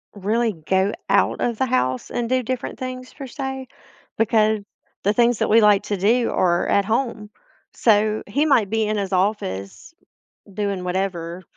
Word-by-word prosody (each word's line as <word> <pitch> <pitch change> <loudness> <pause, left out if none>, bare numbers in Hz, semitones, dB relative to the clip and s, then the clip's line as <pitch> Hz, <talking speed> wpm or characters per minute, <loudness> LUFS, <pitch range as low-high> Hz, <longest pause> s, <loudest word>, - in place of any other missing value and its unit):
really 220 +3 0
go 190 +5 0 0.2
out - - +2
of 235 -2 -1
the 260 - +2
house 130 - 0
and 240 -1 -2
do 255 +1 +1
different 255 +1 -4
things 255 0 -6
per 275 -2 -8
se, 265 -1 -5 0.5
because 220 -1 +2 0.4
the 205 - +2
things 240 0 +3
that - - 0
we 225 +1 +6
like 210 -2 +5
to 205 - -2
do 230 +6 +2
are 175 -1 +1
at 200 - +3
home, 225 -1 -2 0.5
so 215 -1 +2
he 285 +9 +1
might 230 -9 +3
be 225 -1 +1
in 215 0 -1
his 195 -1 -3
office 180 - -2 0.6
doing 200 -2 -2
whatever, 180 -1 -3
215 Hz, 165 wpm, -22 LUFS, 190-240 Hz, 0.6 s, we